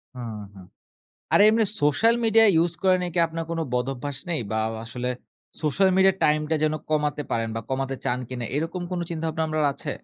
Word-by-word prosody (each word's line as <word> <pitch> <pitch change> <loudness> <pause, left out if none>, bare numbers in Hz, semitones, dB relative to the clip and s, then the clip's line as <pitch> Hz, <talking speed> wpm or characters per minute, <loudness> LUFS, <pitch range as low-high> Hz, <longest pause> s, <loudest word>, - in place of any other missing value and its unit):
হুম, 120 -3 -6 0.2
হুম। 95 -2 -13 0.7
আর - - +6
এমনি 220 +1 +4 0.2
social 150 +11 +4
media 225 0 +5 0.2
use 170 0 -2
করা 185 -1 +4
নিয়ে 180 -1 -3
কি - - +3
আপনার 165 0 -4
কোন 165 - -2
বদভ্যাস 135 +2 -2
নেই? 165 -3 +1
বা - - -1
আও 110 - -3
আসলে 125 +2 -5 0.5
social 180 +5 +2
media 190 0 +5
time 150 0 +3
টা 160 - +2
যেন 155 0 +2 0.2
কমাতে 150 -1 0
পারেন 115 -1 0
বা - - -1
কমাতে 135 0 -2
চান 125 - 0
কিনা 125 -2 -4
এরকম 165 +4 -2
কোনো 175 -1 -2
চিন্তাভাবনা 160 -1 -2
আপনার 155 -1 0
আছে? - - -7
155 Hz, 195 wpm, -24 LUFS, 130-175 Hz, 0.7 s, আর